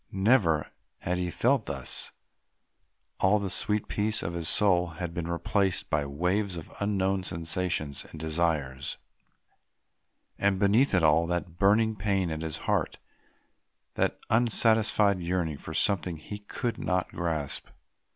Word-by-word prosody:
Never 95 - +2 0.3
had 90 +1 -2
he 90 -1 -1
felt 125 +6 +1
thus. 70 -2 -4 1.1
All 95 +3 +4
the 100 -3 -3
sweet 105 +2 -1
peace 105 +1 -1
of 85 - -3
his 85 -2 0
soul 90 -4 +3
had 85 -1 -4
been 85 -2 -3
replaced 95 +2 -1
by 75 -2 +1
waves 90 +6 -1
of 80 - -9
unknown 95 -1 0
sensations 85 -4 -2
and 80 - -11
desires; 80 -4 -1 1.4
and 100 -1 +2
beneath 105 +5 +3
it 90 - +3
all, 80 +2 +4
that 85 -1 -3
burning 110 +3 +4
pain 95 -4 0
at 80 0 -4
his 80 -2 -3
heart, - - 0 1.0
that - - 0
unsatisfied 110 -3 +3
yearning 85 -4 -2
for 80 - -7
something 90 -4 +2
he 105 +7 -8
could 115 +3 -4
not 90 0 0
grasp. 80 -5 -3
90 Hz, 135 wpm, -28 LUFS, 80-105 Hz, 1.4 s, All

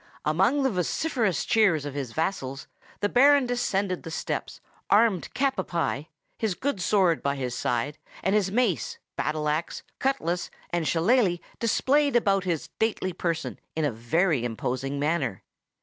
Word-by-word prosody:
Amid 195 - +3
the 265 - +3
vociferous 205 - 0
cheers 190 -10 +3
of 145 - -5
his 135 -4 -4
vassals, 140 -3 -2 0.4
the 205 - +3
Baron 275 +4 +5
descended 200 -6 -1
the - - -8
steps, 160 - -4 0.3
armed 205 -4 +3
cap 270 0 +1
à - - -2
pie, 165 -3 -1 0.3
his 215 -5 0
good 260 -6 -2
sword 180 - +3
by 140 0 0
his 125 -3 -3
side, 125 +6 -1 0.2
and 190 - +2
his 205 -3 +2
mace, 220 -4 0 0.2
battle 150 0 -1
axe, 155 +3 -2 0.2
cutlass, 180 -11 -1 0.2
and 170 -2 0
shillalah 185 +2 +3 0.2
displayed 280 +5 +2
about 195 -5 +3
his 170 -4 -1
stately 215 -4 -2
person 165 -2 -3 0.2
in 160 -1 +1
a 145 - +1
very 135 - +1
imposing 130 +4 -2
manner. 145 - -1
175 Hz, 150 wpm, -26 LUFS, 150-220 Hz, 0.4 s, Baron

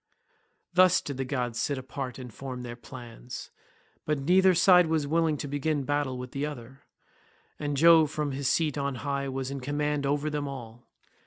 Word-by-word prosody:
Thus 185 0 +6
did 140 -3 -6
the 135 - -2
gods 125 -3 -2
sit 145 - 0
apart 130 -1 -5
and 125 -4 -9
form 130 0 -6
their 120 -1 -6
plans, 120 0 -9 0.5
but 150 0 0
neither 185 +6 +4
side 180 0 +6
was 160 -2 +1
willing 160 0 +1
to 145 - -5
begin 145 +1 -1
battle 145 -2 -1
with 125 0 -7
the 140 - -3
other, 135 -3 -7 0.8
and 145 -1 -2
Jove 160 0 +7
from 150 -1 -2
his 135 0 -2
seat 150 -2 +1
on 140 -1 -1
high 140 -1 -1
was 135 0 -3
in 140 - -4
command 145 +1 -1
over 145 +2 0
them 145 -1 -2
all. 120 -3 -9
140 Hz, 180 wpm, -28 LUFS, 130-150 Hz, 0.8 s, Jove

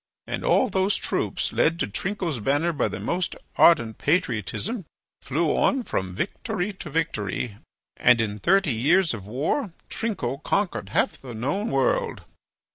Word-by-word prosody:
And - - -4
all 260 - +4
those 190 -1 +1
troops, - - -1
led 165 +1 +2
to - - 0
Trinco's 175 - -2
banner 145 +9 +1
by 145 - +1
the - - -5
most 180 0 -1 0.2
ardent 120 -10 +5
patriotism, 170 - 0 0.4
flew 155 +3 0
on 270 -2 +2
from 95 - -3
victory 205 - -2
to 185 -4 -8
victory, 125 -9 -2 0.4
and 120 -1 +5
in 105 -2 -1
thirty 180 - +3
years 160 +9 +3
of 100 -4 -7
war 160 - -1 0.2
Trinco 140 - -2
conquered 200 -2 0
half - - 0
the 125 -3 -8
known 165 - -1
world." - - +1
165 Hz, 145 wpm, -25 LUFS, 120-195 Hz, 0.4 s, ardent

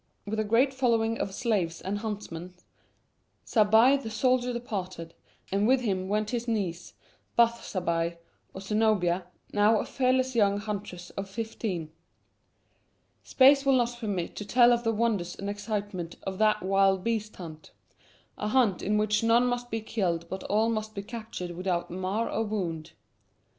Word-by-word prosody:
With 215 +1 -3
a - - +2
great 235 +6 +3
following 230 -3 +1
of 195 - -2
slaves 190 -7 -1
and 200 +2 -3
huntsmen, 190 -5 -6 0.9
Zabbai 225 +5 +5
the 225 - -5
soldier 250 +2 +1
departed, 185 -8 -5 0.4
and 200 +2 +2
with 260 +1 +4
him 190 -5 -1
went 210 +1 0
his 240 -1 -2
niece, 190 -7 -3 0.4
Bath 235 0 +3
Zabbai, 170 -2 -1 0.3
or 190 - -8
Zenobia, 195 -4 +1 0.3
now 210 +2 +4
a - - -1
fearless 255 -1 +1
young 200 -3 +3
huntress 205 -4 -6
of 195 0 -6
fifteen. 195 -6 -4 1.3
Space 275 +1 +5
will 275 -1 +4
not 240 0 0
permit 200 -7 -3
to - - -4
tell 240 +3 +5
of 235 0 0
the 225 - +2
wonders 210 -6 0
and 200 +1 -4
excitement 205 -4 -4
of 190 -1 -5
that 215 -2 +3
wild 195 0 +3
beast 215 -2 -2
hunt 160 -3 -10 0.7
a 210 - -2
hunt 215 -5 +2
in 210 +1 +1
which 210 0 +2
none 230 +2 +4
must 245 0 -2
be 225 -1 -2
killed 180 -7 -2
but 190 - -5
all 220 +2 +2
must 215 -1 -3
be 200 - -4
captured 215 -5 -6
without 175 0 -2
mar 185 +5 -1
or 225 - -1
wound. 180 -8 -3
210 Hz, 160 wpm, -28 LUFS, 185-230 Hz, 1.3 s, Zabbai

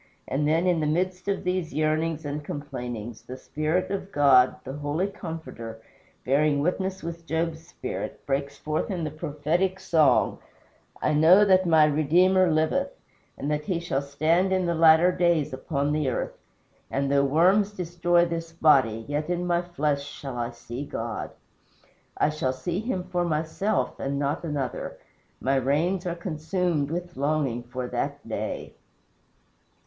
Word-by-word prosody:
And 145 +3 0
then, 165 +3 +2
in 180 -2 +2
the 155 - 0
midst 180 +4 -1
of 200 -1 -1
these 180 -5 -2
yearnings 155 +1 0
and 145 +1 -4
complainings, 120 -6 -6
the 130 - -9
Spirit 160 +7 -1
of 195 0 -4
God, 135 -4 +5
the 135 - -6
Heavenly 145 +5 -1
Comforter, 160 - -7 0.5
bearing 145 +2 +3
witness 190 +4 -1
with 170 0 -7
Job's 165 0 -2
spirit, - - -6
breaks 140 +1 -2
forth 155 +2 -2
in 180 -4 -2
the 155 - -2
prophetic 155 +6 -1
song: 165 -5 +3 0.6
"I 155 - +2
know 170 +7 +7
that 185 -2 +4
my 160 -2 +6
Redeemer 175 +5 +4
liveth 160 - +1 0.5
And 145 +2 -3
that 150 0 -1
he 180 -3 -1
shall 155 -5 -1
stand 155 +7 +1
in 185 -1 +2
the 170 - +1
latter 165 +2 +6
days 170 -6 +1
upon 140 +2 -1
the 150 -3 +1
earth. 125 - -3 0.5
And 140 +1 -1
though 140 0 +4
worms 185 +9 +3
destroy 175 -2 +1
this 165 -1 -4
body, 135 -9 +3
Yet 150 +3 -2
in 175 0 -1
my 175 -1 +2
flesh 150 -5 -1
shall 140 -2 -7
I 120 -1 -2
see 120 +2 -7
God. 115 -5 -4 0.9
I - - +3
shall 130 -4 -1
see 175 +7 -3
him 215 -5 -2
for 180 -1 -1
myself 165 +6 -1
and 140 +1 -2
not 145 +3 -1
another. 145 -6 -3 0.4
My 135 +1 +1
reins 165 +8 +1
are 170 - -2
consumed 170 -2 -1
with 175 +2 -5
longing 140 -4 0
for 125 +1 -5
that - - -3
day." - - -4
155 Hz, 155 wpm, -26 LUFS, 140-175 Hz, 0.9 s, know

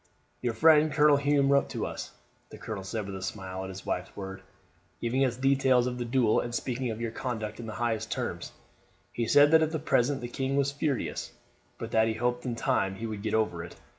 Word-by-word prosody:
"Your 120 -2 -1
friend 155 +3 +5
Colonel 150 0 +5
Hume 140 -1 +2
wrote 140 0 +3
to - - -3
us," - - -6 0.4
the - - -10
colonel 105 -4 -6
said 105 +2 -4
with 100 -1 -6
a 95 - -6
smile 95 -1 -5
at 95 - -5
his 95 +1 -9
wife's 90 +1 -3
word, 95 -1 -7 0.6
"giving 125 +3 +1
us 125 -2 0
details 130 -2 +3
of 125 0 -3
the 120 - -2
duel, 120 -2 +3
and 120 0 -3
speaking 125 +1 -2
of 110 0 -4
your 115 -1 -3
conduct 110 -4 -4
in 115 - -6
the 110 - -6
highest 115 -2 -2
terms. - - -3 0.6
He 115 -1 -1
said 145 +5 +6
that 160 0 +7
at 160 -1 -1
present 135 +3 +2
the 120 - -4
king 135 +2 -2
was 140 0 +2
furious; 140 -2 -2 0.5
but - - -6
that 110 0 +3
he 110 - -1
hoped 120 +2 -1
in 120 - -2
time 95 -4 0
he 110 - -5
would 110 -2 -5
get 110 0 -1
over 105 -7 0
it. 85 - -10
120 Hz, 225 wpm, -28 LUFS, 110-135 Hz, 0.6 s, that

